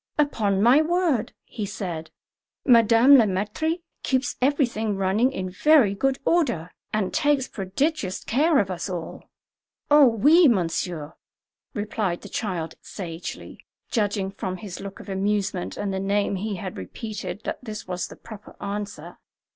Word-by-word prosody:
"Upon 210 -10 +1
my 250 +6 +6
word!" 330 -7 +1
he 220 - -6
said, 175 -5 -5 0.6
"Madame 235 +2 +7
Le 230 - +5
Maître 215 - -1 0.2
keeps 260 0 0
everything 245 -6 +1
running 200 +7 +2
in 185 -7 -4
very 265 0 +4
good 270 +6 0
order, 240 - +1 0.2
and 215 -4 -1
takes 290 -3 +2
prodigious 200 - -2
care 300 +6 +2
of 195 -5 +1
us 185 +2 -4
all." 170 -3 -6 0.6
"Oh, 295 -2 +8
oui, 295 - +5
monsieur," 170 - -1 0.6
replied 205 -4 -2
the - - -10
child 175 -7 -3
sagely, 170 -3 -7 0.3
judging 205 -4 0
from 185 -1 -4
his 190 -2 -8
look 195 0 -8
of - - -11
amusement 195 -1 -1
and 200 -1 -2
the 190 - -2
name 200 +1 0
he 210 +2 -3
had 185 0 -6
repeated 195 - -6
that - - -5
this 215 -5 -7
was 180 0 -3
the - - -11
proper 215 -3 -12
answer. 205 0 -6
205 Hz, 145 wpm, -24 LUFS, 190-255 Hz, 0.6 s, Oh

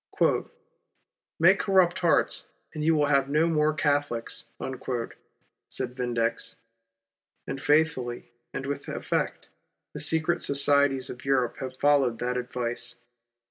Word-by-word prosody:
" - - -51
Make - - +5
corrupt 185 -3 +3
hearts 170 -2 +1 0.3
and 155 - -4
you 160 +1 +3
will 150 -1 +3
have 140 -1 +2
no 155 +3 +3
more 155 -2 +2
Catholics," 145 -5 0 1.2
said 125 -1 -3
Vindex, 120 -2 -2 0.9
and 135 - -5
faithfully, 145 -6 +1 0.2
and 135 - -5
with 140 +1 -4
effect, - - -3 0.4
the - - -6
secret 160 +1 +1
societies 140 -2 +3
of. 125 - -10
Europe 130 -3 +1
have 130 -1 -6
followed 140 -5 +3
that 125 +1 -2
advice. 120 -1 -3
140 Hz, 120 wpm, -27 LUFS, 125-150 Hz, 1.2 s, Make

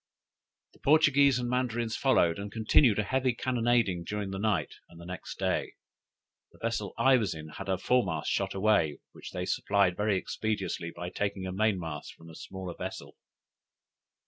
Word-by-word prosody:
The - - -22
Portuguese 140 -3 +5
and 125 -1 -2
Mandarins 120 -2 -1
followed, 85 -10 +3
and 100 0 -6
continued 110 +1 +4
a 105 - +2
heavy 130 +2 0
cannonading 120 -8 +1
during 105 0 -3
that 95 - -4
night 105 0 0 0.2
and 85 - -15
the 85 - -10
next 90 0 -7
day. - - -1 0.8
The - - -20
vessel 115 -3 -3
I 130 -1 +5
was 105 -8 -1
in 80 0 -8
had 95 +5 -8
her 95 -1 +1
foremast 100 -4 +1
shot - - -1
away, 95 -8 +2
which - - -10
they - - -4
supplied 100 -3 +2
very 105 -1 +1
expeditiously 105 -3 -3
by 90 0 -5
taking 100 0 -2
a 95 - -3
mainmast 90 -7 -2
from 80 0 -14
a - - -13
smaller 95 0 -7
vessel. - - -7
105 Hz, 170 wpm, -29 LUFS, 90-120 Hz, 0.8 s, Portuguese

